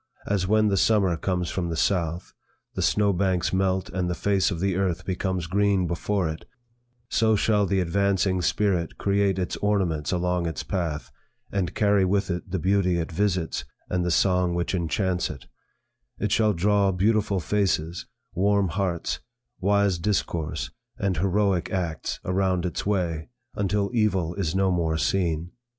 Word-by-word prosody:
As 100 -2 0
when 110 +1 +3
the 100 - +1
summer 100 -4 +3
comes 90 +1 -2
from 85 -3 -2
the 80 - -2
south; 85 -2 0 0.4
the - - -3
snow 105 -1 +3
banks 95 -1 0
melt, 95 0 +1
and 90 -1 -1
the 90 - -1
face 100 +1 +1
of 90 -5 -3
the 95 0 0
earth 95 -3 -1
becomes 95 -2 -2
green 100 +1 +2
before 90 +2 -1
it, 80 0 -5 0.6
so 110 -1 +2
shall 105 -1 +2
the 95 +1 +1
advancing 95 +1 +1
spirit 95 -3 0
create 100 -1 +1
its 90 -1 -2
ornaments 95 -7 0
along 90 -1 0
its 80 -4 -4
path, 75 -8 -3 0.4
and 95 -3 -2
carry 100 -2 +3
with 95 +1 +1
it 90 +2 -4
the 95 - -1
beauty 95 0 +2
it 85 -1 -3
visits, 90 -6 0 0.3
and 90 -1 +1
the 90 - 0
song 90 0 +2
which 85 +2 -1
enchants 90 +1 0
it; 70 -4 -8 0.7
it - - -2
shall 110 -2 +3
draw 100 +2 +2
beautiful 100 +1 +1
faces, 90 -2 -1 0.3
warm 100 0 +2
hearts, 90 -1 -2 0.4
wise 100 -2 +2
discourse, 85 -4 -2 0.3
and 95 -4 -1
heroic 95 0 +1
acts, 85 -4 -3
around 95 -1 +1
its 90 +2 -3
way, 85 -6 -1 0.2
until 100 +1 0
evil 95 -7 +1
is 90 -3 -2
no 95 0 +2
more 80 -3 0
seen. 85 -1 0
95 Hz, 160 wpm, -25 LUFS, 85-100 Hz, 0.7 s, when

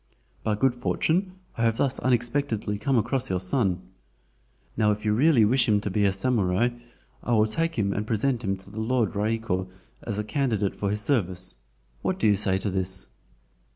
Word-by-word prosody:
By 110 - 0
good 130 +4 +2
fortune, 170 +9 0 0.2
I - - -2
have 115 -1 +2
thus 135 -2 +1
unexpectedly 120 -4 0
come 130 +4 +1
across 125 +3 0
your 95 - 0
son. 95 -1 0 0.9
Now 105 -1 +3
if 105 +1 -3
you 105 - +2
really 130 -1 +5
wish 120 +2 +2
him 105 -1 +4
to 100 -1 -4
be 105 +1 +2
a 100 - +4
SAMURAI 95 -2 +1
(a 120 +4 +3
knight), 120 0 -16 0.4
I 120 - -1
will 110 -1 +5
take 165 +9 -1
him 100 -3 0
and 105 +2 -3
present 120 +3 0
him 95 -2 -1
to 95 +1 -11
the 110 +2 -5
Lord 120 0 +1
Raiko 105 -3 -1 0.3
as 105 -3 -4
a 105 - -1
candidate 105 -3 0
for 100 - -2
his 105 +1 -1
service. 95 - -1 0.4
What - - -1
do - - -1
you 105 -1 +5
say 95 -1 +2
to 100 +1 -2
this?" 95 0 -2
110 Hz, 200 wpm, -26 LUFS, 100-125 Hz, 0.9 s, really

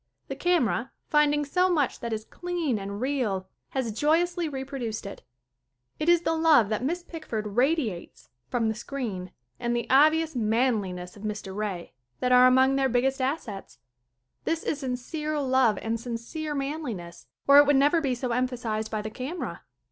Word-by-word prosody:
The - - -3
camera, 285 - +1 0.2
finding 295 -1 +3
so 360 +6 +2
much 295 -7 +1
that 235 - -4
is 220 0 -3
clean 345 -10 -2
and 200 +1 -5
real, 240 -8 -1 0.2
has 260 -4 -2
jovously 330 - +1
reproduced 265 -6 -5
it. 200 - -8 0.8
It 310 - +1
is 345 -1 +5
the 325 - 0
love 320 -9 +4
that 215 +2 -1
Miss 345 +6 -1
Pickford 310 -12 -5
radiates 240 - -1 0.2
from 235 -2 0
the 220 - +1
screen 215 -6 -5 0.3
and 240 0 -1
the 235 - -1
obvious 310 +3 +4
manliness 215 -6 0
of 205 - -13
Mr. 210 -3 -5
Ray 200 -5 -4 0.3
that 250 - 0
are 250 0 +8
among 260 +1 +4
their 270 -1 +2
biggest 265 +2 +1
assets. 255 -7 -3 0.7
This 325 0 -1
is 300 - -2
sincere 295 +4 -3
love 260 -5 +3
and 225 +1 -1
sincere 250 +7 -5
manliness, 275 - -5 0.2
or 280 +1 +9
it 290 - +6
would 290 - +5
never 290 +5 +4
be 265 -4 0
so 245 0 -3
emphasized 235 -3 -1
by 215 -1 -3
the 215 - -5
camera. 270 +10 -5
255 Hz, 165 wpm, -27 LUFS, 220-300 Hz, 0.8 s, or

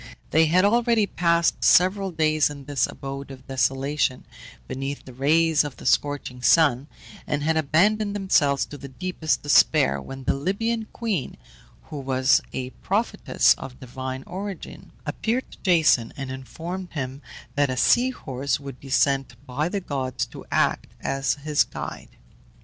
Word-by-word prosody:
They 160 +1 +5
had 180 +4 +4
already 230 0 +3
passed 170 -2 +1
several 190 +2 +4
days 155 -3 +2
in 140 -2 -9
this 140 -4 +1
abode 135 0 -7
of 130 -1 -11
desolation, 135 0 0 0.4
beneath 135 +2 -5
the 130 - -11
rays 155 +4 +3
of 145 -3 -7
the - - -12
scorching 145 -3 0
sun, 140 -1 +4 0.4
and 145 -1 -1
had 160 +1 +1
abandoned 200 +8 +2
themselves 145 -8 +2
to 145 - -10
the 140 - -8
deepest 160 +3 -2
despair, 70 - +4
when 135 - -8
the - - +1
Libyan 220 +9 -1
queen, 215 - -3 0.5
who 150 - -4
was 130 -1 +3
a 130 0 -4
prophetess - - +2
of 125 -1 -9
divine 130 +1 -6
origin, 195 0 -7
appeared 240 +4 -2
to - - -14
Jason, 160 - +3
and 135 -1 -5
informed 170 +8 -7
him 135 -2 -4 0.3
that 145 -1 +2
a 130 - -2
sea 245 - +4
horse 140 - -3
would 140 -3 -9
be 135 - -11
sent 135 -2 +1
by 145 +5 -2
the 200 +1 -2
gods 135 -6 -2
to - - -11
act - - +1
as 135 0 0
his 150 +1 +1
guide. - - -8
145 Hz, 155 wpm, -24 LUFS, 135-180 Hz, 0.5 s, They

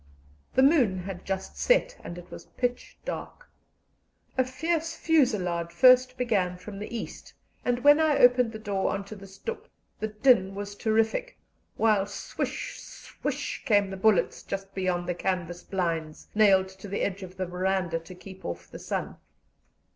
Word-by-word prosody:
The 260 - +5
moon 265 - +4
had 185 -1 -7
just 190 0 -4
set, - - +3
and 170 - -7
it 175 0 -11
was - - -10
pitch 245 -1 -2
dark. - - -6 0.9
A 260 - +3
fierce 325 +6 -2
fusillade 185 - +1
first 255 +5 +6
began 195 -8 0
from 200 +2 -9
the 210 - -6
east, - - -8 0.3
and 245 0 0
when 290 +1 +7
I 315 -2 +3
opened 245 -1 +5
the 220 - -6
door 200 -3 -1
on 195 0 -3
to 215 - -9
the 195 -1 -11
stoep 440 - -7 0.3
the 220 - -1
din 210 -3 +3
was 205 0 -5
terrific, 225 - 0 0.4
while 210 -3 +3
swish, 205 - -4
swish, - - -5
came 205 -6 +3
the - - -4
bullets 195 -3 +2
just 195 0 -6
beyond 180 -2 -1
the 180 - 0
canvas 175 -1 -2
blinds, 165 -5 -3
nailed 195 -3 +5
to 190 +2 -11
the 200 - -3
edge 200 0 -1
of 185 0 -9
the 185 - -1
verandah 180 -1 -1
to 165 +2 -12
keep 190 +1 -12
off 85 - -6
the - - -8
sun. - - -4
200 Hz, 165 wpm, -27 LUFS, 185-250 Hz, 0.9 s, when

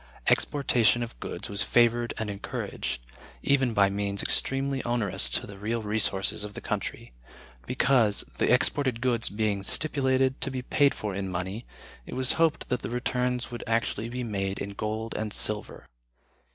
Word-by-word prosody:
Exportation 120 -4 +3
of 115 - -8
goods - - -5
was 100 0 0
favored 120 0 +3
and 110 - -2
encouraged 100 -10 -4 0.4
(even 135 -3 +3
by 100 -3 +4
means 100 0 -1
extremely 135 0 +1
onerous 120 -5 0
to - - -1
the 100 -1 -11
real 115 +2 -2
resources 105 -2 +1
of 105 0 -6
the - - -4
country), - - -4 0.5
because, 125 -5 +3 0.2
the - - +3
exported 130 -5 +2
goods 120 -2 +1
being 105 -1 -1
stipulated 130 +2 +1
to 135 - 0
be 130 -1 -4
paid 140 +2 +3
for 105 -2 -4
in 95 0 -3
money, 95 +6 -4 0.4
it - - -6
was 130 0 +2
hoped 165 -2 +2
that 125 - 0
the - - -4
returns 125 0 -1
would 120 - -6
actually 115 0 0
be 125 +1 -4
made 100 -3 -2
in 100 - -4
gold 110 +2 -4
and 110 -1 -3
silver. 105 -1 +1
115 Hz, 165 wpm, -27 LUFS, 100-125 Hz, 0.5 s, by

